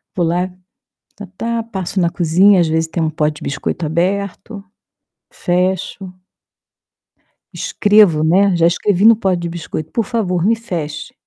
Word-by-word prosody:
Vou 175 - +1
lá, 175 +3 -1 0.7
tá, 205 - -9
tá, 230 +1 -2
passo 195 -4 -4
na 170 - +2
cozinha, 180 +3 +4
às 170 - +1
vezes 160 0 0
tem 170 +1 -3
um 160 - 0
pote 150 -1 -1
de - - -13
biscoito 145 +4 -3
aberto, 195 +5 -3 0.7
fecho. 185 +1 -2 1.4
Escrevo, 205 -7 +3
né, 185 +4 +3
já 170 -1 +1
escrevi 180 +3 +1
no 225 0 +7
pote 190 -4 0
de 170 - -4
biscoito: 160 -2 -6
"Por 230 - -1
favor, 185 -8 -1
me 225 - +4
feche". 175 -10 -6
180 Hz, 150 wpm, -17 LUFS, 165-200 Hz, 1.4 s, no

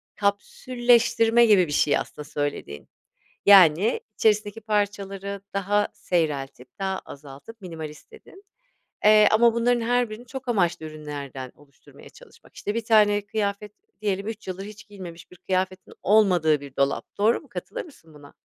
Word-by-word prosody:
kapsülleştirme 235 +2 +2
gibi 200 -6 +4
bir - - -7
şey 145 0 +2
aslında 150 - -6
söylediğin. 145 - -5 0.6
Yani 195 +1 +6 0.2
içerisindeki 210 0 +1
parçaları 200 -2 -3
daha 205 +1 +1
seyreltip, 140 -7 -2
daha 190 -1 -2
azaltıp 145 +10 -12
minimalist 160 - -9
dedin. 405 -3 -16 0.6
Eee, 215 0 +7
ama 230 +1 +4
bunların 240 +1 +2
her 245 0 +1
birini 230 +3 -9
çok 260 +1 -8
amaçlı 175 -7 0
ürünlerden 145 -4 -8
oluşturmaya 140 -1 -18
çalışmak. - - -19
İşte 205 - -4
bir 230 - -2
tane 205 -2 +3
kıyafet 205 0 -3 0.3
diyelim 200 -1 -2
3 220 -3 -7
yıldır 185 +1 -5
hiç 215 +1 -12
giyilmemiş 180 -5 -11
bir 180 - -15
kıyafetin 185 +1 -3
olmadığı 180 -8 +3
bir 140 -2 -12
dolap, 140 0 0
doğru 215 +3 +3
mu, - - -20
katılır - - -6
mısın 165 - -18
buna? 145 -1 -15
200 Hz, 145 wpm, -24 LUFS, 160-220 Hz, 0.6 s, Eee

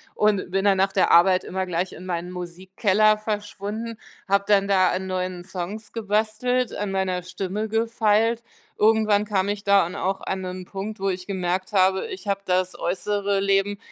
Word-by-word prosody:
und 205 -4 +1
bin 195 +1 0
dann 195 -1 +4
nach 195 +1 +2
der - - +3
Arbeit 185 +2 +5
immer 190 0 -3
gleich 180 +1 -2
in 180 - -10
meinen 175 -1 -3
Musikkeller 190 +4 +1
verschwunden, 215 +1 -4 0.3
habe 200 0 +2
dann 200 -1 +4
da 185 -2 +4
an 190 +1 -3
neuen 185 -1 -3
Songs 190 +4 -6
gebastelt, 225 +3 0
an 205 -1 -3
meiner 190 -2 -1
Stimme 190 +4 -4
gefeilt. 225 0 +1 0.4
Irgendwann 215 -1 +3
kam 200 -2 0
ich 205 0 -4
da 200 -1 +5
an 175 - -7
auch 190 +1 -1
an 190 - -3
'nen 185 0 -6
Punkt, 195 +2 -6
wo 195 - +1
ich 180 -1 -4
gemerkt 185 +1 -2
habe, 190 - +3
ich 380 - -7
habe 195 0 +1
das 185 0 0
äußere 200 +2 -1
Leben 195 +1 +1
195 Hz, 175 wpm, -24 LUFS, 185-210 Hz, 0.4 s, Arbeit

